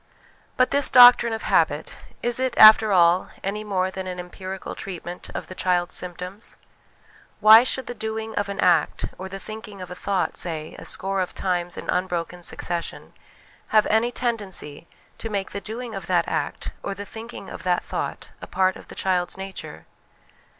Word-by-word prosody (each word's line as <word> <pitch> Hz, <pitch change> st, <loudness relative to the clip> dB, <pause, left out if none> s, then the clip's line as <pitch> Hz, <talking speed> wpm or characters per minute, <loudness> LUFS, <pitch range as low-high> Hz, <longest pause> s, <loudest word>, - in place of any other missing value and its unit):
But 255 Hz, -, +3 dB
this 285 Hz, -1 st, +5 dB
doctrine 245 Hz, -2 st, +8 dB
of 225 Hz, -, -4 dB
habit, -, -, +1 dB, 0.3 s
is 240 Hz, +1 st, +3 dB
it, 260 Hz, 0 st, -1 dB
after 215 Hz, 0 st, +9 dB
all, 175 Hz, -1 st, +4 dB
any 210 Hz, +2 st, -3 dB
more 190 Hz, -3 st, -1 dB
than 190 Hz, 0 st, -6 dB
an 180 Hz, -1 st, -5 dB
empirical 185 Hz, +1 st, -7 dB
treatment 180 Hz, -2 st, -7 dB
of -, -, -4 dB
the -, -, -9 dB
child's 180 Hz, -1 st, 0 dB
symptoms? 180 Hz, +4 st, -5 dB, 0.8 s
Why 220 Hz, +2 st, +9 dB
should 260 Hz, 0 st, -2 dB
the -, -, -5 dB
doing 220 Hz, 0 st, -5 dB
of 205 Hz, -1 st, -2 dB
an 200 Hz, -1 st, -5 dB
act 175 Hz, -4 st, +2 dB
or 190 Hz, +1 st, -6 dB
the 195 Hz, -, -6 dB
thinking 210 Hz, 0 st, -8 dB
of 180 Hz, -1 st, -8 dB
a -, -, -6 dB
thought, 195 Hz, +1 st, -2 dB
say, 160 Hz, -3 st, -4 dB
a -, -, -10 dB
score 195 Hz, 0 st, -2 dB
of 180 Hz, -, -4 dB
times 175 Hz, -2 st, -2 dB
in -, -, -7 dB
unbroken 180 Hz, -1 st, -2 dB
succession, 175 Hz, 0 st, -4 dB, 0.5 s
have 215 Hz, -1 st, +4 dB
any 225 Hz, +3 st, +2 dB
tendency 200 Hz, -11 st, -3 dB, 0.3 s
to 225 Hz, -, -5 dB
make 200 Hz, -2 st, -3 dB
the 200 Hz, -, -5 dB
doing 230 Hz, +2 st, -6 dB
of 195 Hz, -, -7 dB
that 175 Hz, -2 st, +2 dB
act 155 Hz, -3 st, -3 dB
or 200 Hz, -, -4 dB
the 205 Hz, +1 st, -7 dB
thinking 225 Hz, -1 st, -9 dB
of -, -, -8 dB
that 180 Hz, -1 st, 0 dB
thought -, -, -5 dB
a -, -, -8 dB
part 185 Hz, 0 st, +1 dB
of -, -, -15 dB
the -, -, -11 dB
child's 180 Hz, -1 st, -1 dB
nature? 190 Hz, 0 st, -8 dB
195 Hz, 180 wpm, -23 LUFS, 180-220 Hz, 0.8 s, after